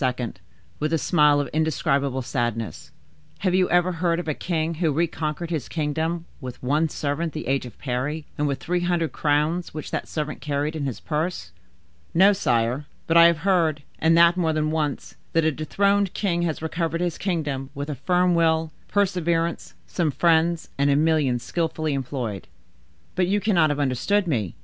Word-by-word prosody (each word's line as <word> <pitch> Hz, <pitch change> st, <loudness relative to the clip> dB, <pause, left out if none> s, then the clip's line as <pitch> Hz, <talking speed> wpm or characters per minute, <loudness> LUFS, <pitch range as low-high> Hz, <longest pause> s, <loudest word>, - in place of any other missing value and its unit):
with 150 Hz, +1 st, -1 dB
a 165 Hz, -, +3 dB
smile 150 Hz, -2 st, +4 dB
of 145 Hz, -, -1 dB
indescribable 140 Hz, -4 st, 0 dB
sadness, 120 Hz, -3 st, -3 dB, 0.5 s
"have 185 Hz, -3 st, +1 dB
you 185 Hz, 0 st, +3 dB
ever 175 Hz, +1 st, +3 dB
heard 170 Hz, 0 st, 0 dB
of 175 Hz, -, -5 dB
a 155 Hz, -, +1 dB
king 165 Hz, 0 st, -2 dB
who 160 Hz, -3 st, +3 dB
reconquered 160 Hz, +1 st, -2 dB
his 155 Hz, -7 st, -3 dB
kingdom 160 Hz, +2 st, -2 dB
with 125 Hz, -3 st, -8 dB
one 150 Hz, +5 st, +1 dB
servant 150 Hz, +3 st, -2 dB
the 155 Hz, -, -5 dB
age 135 Hz, -1 st, 0 dB
of 120 Hz, -, -13 dB
Parry, 140 Hz, +4 st, -3 dB
and 150 Hz, -, 0 dB
with 140 Hz, -1 st, -2 dB
three 180 Hz, +1 st, -1 dB
hundred 175 Hz, -2 st, 0 dB
crowns 155 Hz, +4 st, 0 dB
which 155 Hz, -, -6 dB
that -, -, -3 dB
servant 150 Hz, -1 st, -4 dB
carried 145 Hz, +1 st, -2 dB
in 150 Hz, -3 st, -2 dB
his 130 Hz, -, -5 dB
purse?" 155 Hz, -, -3 dB, 0.6 s
"No, 195 Hz, +4 st, +6 dB
sire; 125 Hz, -, 0 dB, 0.2 s
but 165 Hz, -, 0 dB
I 170 Hz, 0 st, +9 dB
have 170 Hz, -2 st, +1 dB
heard—and 165 Hz, -3 st, +2 dB
that 170 Hz, +1 st, +6 dB
more 165 Hz, -3 st, +1 dB
than 155 Hz, 0 st, 0 dB
once—that 155 Hz, +1 st, -2 dB
a 160 Hz, -, +3 dB
dethroned 200 Hz, +6 st, +1 dB
king 175 Hz, -4 st, 0 dB
has 160 Hz, -2 st, -2 dB
recovered 165 Hz, +1 st, -2 dB
his 175 Hz, -2 st, -2 dB
kingdom 145 Hz, -8 st, -2 dB
with 140 Hz, +1 st, -4 dB
a 150 Hz, -, -3 dB
firm 180 Hz, +6 st, +2 dB
will, 160 Hz, -1 st, +2 dB, 0.2 s
perseverance, 170 Hz, -, 0 dB
some 125 Hz, -, -1 dB
friends, 165 Hz, +2 st, +2 dB
and 140 Hz, 0 st, +3 dB
a 140 Hz, -, +4 dB
million 150 Hz, -4 st, +2 dB
skillfully 155 Hz, +3 st, -2 dB
employed." 125 Hz, -7 st, -4 dB, 0.7 s
"But 180 Hz, -1 st, +1 dB
you 205 Hz, +2 st, +2 dB
cannot 185 Hz, -6 st, +3 dB
have 145 Hz, 0 st, -1 dB
understood 145 Hz, +10 st, +1 dB
me. 115 Hz, -, -1 dB
160 Hz, 175 wpm, -24 LUFS, 145-170 Hz, 0.7 s, I